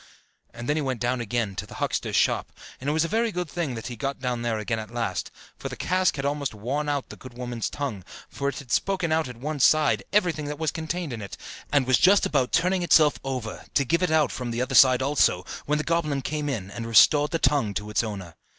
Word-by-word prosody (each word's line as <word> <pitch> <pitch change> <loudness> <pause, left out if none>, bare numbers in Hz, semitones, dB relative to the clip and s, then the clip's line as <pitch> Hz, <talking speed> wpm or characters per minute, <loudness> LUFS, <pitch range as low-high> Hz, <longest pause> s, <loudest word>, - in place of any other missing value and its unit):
And 120 +1 -8
then 150 - +1
he - - +1
went 130 -4 -2
down 125 0 0
again 115 -3 -2
to - - -4
the - - -11
huckster's - - -2
shop: - - +1 0.3
and 135 - -3
it - - +2
was 160 +2 +2
a - - -1
very 225 +4 0
good 180 -2 -3
thing 155 -5 -3
that 115 - -7
he 125 - -5
got 135 +2 -3
down 125 -2 -2
there 115 -2 -1
again 110 +1 -2
at 110 - -7
last, 115 -6 -3 0.3
for - - -5
the - - -6
cask 185 0 +1
had 135 -1 -3
almost 140 -4 -2
worn 135 +8 -2
out 145 -2 -2
the - - -9
good 125 -2 -13
woman's 120 -2 -3
tongue, 135 -10 -4 0.2
for 140 0 -2
it 140 - -6
had 130 -5 -9
spoken 185 - 0
out 160 -1 +1
at 125 -2 -9
one 145 +4 -4
side 155 +3 +4
everything 175 -7 +1
that 145 0 -4
was 160 -2 -1
contained 160 -2 -4
in 115 - -6
it, 100 - -8 0.3
and 145 -3 +3
was 130 0 +3
just 195 +2 +5
about 135 -4 +1
turning 180 +2 +2
itself 155 -3 +4
over, 125 -5 -4
to 140 - +3
give 170 +7 +1
it 180 - +2
out 155 -1 +3
from 125 -1 -4
the 115 0 -3
other 130 +2 -2
side 130 -1 +6
also, 130 -10 +2 0.2
when 150 +1 +2
the 150 - -1
goblin 155 -5 0
came 150 -1 -2
in, 100 -8 -4
and 115 +2 -6
restored 145 +6 +6
the 165 - 0
tongue 140 -9 +2
to 105 0 -4
its 105 - +1
owner. 95 -6 -6
140 Hz, 250 wpm, -25 LUFS, 120-155 Hz, 0.3 s, side